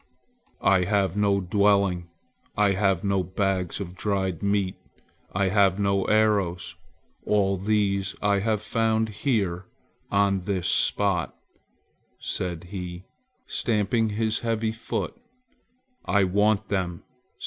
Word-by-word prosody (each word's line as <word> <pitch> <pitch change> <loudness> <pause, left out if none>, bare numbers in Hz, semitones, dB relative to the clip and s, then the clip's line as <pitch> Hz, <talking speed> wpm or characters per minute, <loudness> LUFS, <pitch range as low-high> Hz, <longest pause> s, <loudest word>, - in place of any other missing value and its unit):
"I 95 -2 +4
have 100 -2 +1
no 100 -1 +2
dwelling. 100 -2 +2 0.5
I 105 -1 +4
have 95 -1 +1
no 100 -1 +1
bags 95 0 -1
of 90 -3 -6
dried 95 -4 -1
meat. 100 -2 0 0.6
I 95 +1 +1
have 100 -1 +3
no 100 -1 +1
arrows. 100 -6 +1 0.5
All 100 -2 +2
these 100 0 0
I 100 -1 +2
have 110 +1 0
found 110 0 +1
here 100 -5 -1 0.4
on 100 -1 +2
this 95 -3 -1
spot," 100 -5 +1 0.8
said 90 -3 -4
he, 90 -1 -6 0.4
stamping 110 0 0
his 110 +1 0
heavy 115 -1 -1
foot. 110 - -4 0.9
"I 100 -1 +2
want 100 +2 +2
them! 90 -4 -2
100 Hz, 115 wpm, -25 LUFS, 95-105 Hz, 0.9 s, I